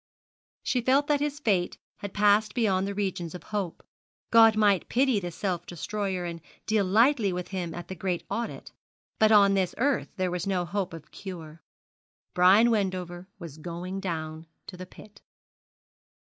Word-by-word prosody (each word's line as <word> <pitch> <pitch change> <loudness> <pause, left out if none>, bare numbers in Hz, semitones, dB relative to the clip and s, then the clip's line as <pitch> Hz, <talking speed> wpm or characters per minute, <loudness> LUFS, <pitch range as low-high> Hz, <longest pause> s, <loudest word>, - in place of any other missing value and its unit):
She 250 - 0
felt 270 +4 +3
that 290 -1 +1
his 295 0 -2
fate 195 - 0 0.2
had 200 - -7
passed 210 +1 +3
beyond 195 -5 +1
the 200 - -4
regions 185 -4 -3
of 180 - -9
hope. 200 -5 -4 0.5
God 225 -1 +7
might 205 -4 +2
pity 255 -3 +2
the 175 -2 -5
self 175 0 -3
destroyer, 190 +1 -3
and 170 -1 -6 0.2
deal 215 -2 +2
lightly 220 +2 +3
with 180 0 -4
him 175 -4 -4
at 175 - -7
the - - -6
great 180 -1 -3
audit; 230 +3 -5 0.5
but 220 0 +5
on 200 -2 +6
this 190 -2 0
earth 275 +3 0
there 185 -1 0
was 180 +1 -3
no 185 -2 0
hope 185 -1 -3
of 155 -2 -13
cure. 165 -5 -9 0.7
Brian 195 +6 +6
Wendover 185 -4 -2
was 165 -5 -10
going 175 +3 -5
down 160 -3 -5 0.2
to 185 - -9
the 185 0 -9
pit. 210 +2 -16
190 Hz, 165 wpm, -27 LUFS, 175-215 Hz, 0.7 s, God